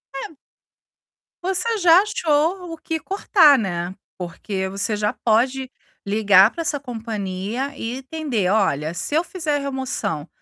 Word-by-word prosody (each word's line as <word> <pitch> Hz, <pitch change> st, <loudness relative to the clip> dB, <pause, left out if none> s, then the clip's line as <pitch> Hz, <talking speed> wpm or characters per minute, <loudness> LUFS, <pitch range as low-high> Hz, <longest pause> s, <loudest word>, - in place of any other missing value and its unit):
É 280 Hz, +2 st, -6 dB, 1.1 s
você 385 Hz, +5 st, 0 dB
já 355 Hz, -1 st, +6 dB
achou 340 Hz, -1 st, 0 dB
o 330 Hz, -, -7 dB
que 320 Hz, 0 st, -3 dB
cortar, 360 Hz, -6 st, +4 dB
né, 175 Hz, -3 st, -3 dB, 0.2 s
porque 190 Hz, +2 st, -4 dB
você 200 Hz, +3 st, -1 dB
já 210 Hz, 0 st, 0 dB
pode 255 Hz, +4 st, +1 dB, 0.3 s
ligar 200 Hz, 0 st, +5 dB
para 335 Hz, -, -5 dB
essa 300 Hz, -3 st, -1 dB
companhia 225 Hz, 0 st, -4 dB
e 235 Hz, +3 st, -4 dB
entender: 265 Hz, -, -2 dB
"Olha, 165 Hz, -7 st, +1 dB
se 290 Hz, -, -3 dB
eu 325 Hz, -, +3 dB
fizer 320 Hz, -5 st, -2 dB
a -, -, -2 dB
remoção 260 Hz, -, -3 dB
255 Hz, 140 wpm, -22 LUFS, 200-315 Hz, 1.1 s, já